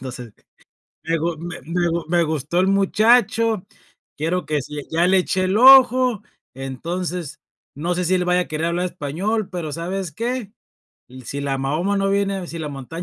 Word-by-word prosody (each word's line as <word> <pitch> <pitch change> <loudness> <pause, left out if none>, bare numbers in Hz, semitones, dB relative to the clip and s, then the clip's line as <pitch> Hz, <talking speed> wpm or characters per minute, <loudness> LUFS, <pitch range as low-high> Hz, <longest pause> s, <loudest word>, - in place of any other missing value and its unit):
Entonces, 125 -3 -8 0.7
me 165 +1 -1
gu 165 +1 -2
me 175 +1 -7
me 175 +2 0
gu 170 0 -2
me 175 0 +3
gustó 155 +2 -1
el 190 - +2
muchacho, 220 +2 +3 0.5
quiero, 165 +2 -2
que 150 -3 -1
si 150 0 -8
ya 170 +2 +2
le 190 +1 +4
eché 185 +1 0
el 190 +3 +1
ojo. 255 -3 +7 0.3
Entonces, 165 +5 -5 0.3
no 170 +5 -2
sé, 180 0 -1
si 185 - +2
él 180 -1 +1
vaya 180 0 +2
a - - -11
querer 155 +1 -2
hablar 175 +2 -1
español, 185 +7 -3
pero, 175 -5 -4
¿sabes 180 +2 -4
qué? 235 - -3 0.7
"Si 140 +3 -5
la 140 -1 -1
Mahoma, 155 +9 -1
no 195 0 +1
viene 200 0 0
a 180 -2 -5
Si 165 - -7
la 155 -2 -4
montaña, 140 +5 -7
175 Hz, 185 wpm, -21 LUFS, 155-195 Hz, 0.7 s, ojo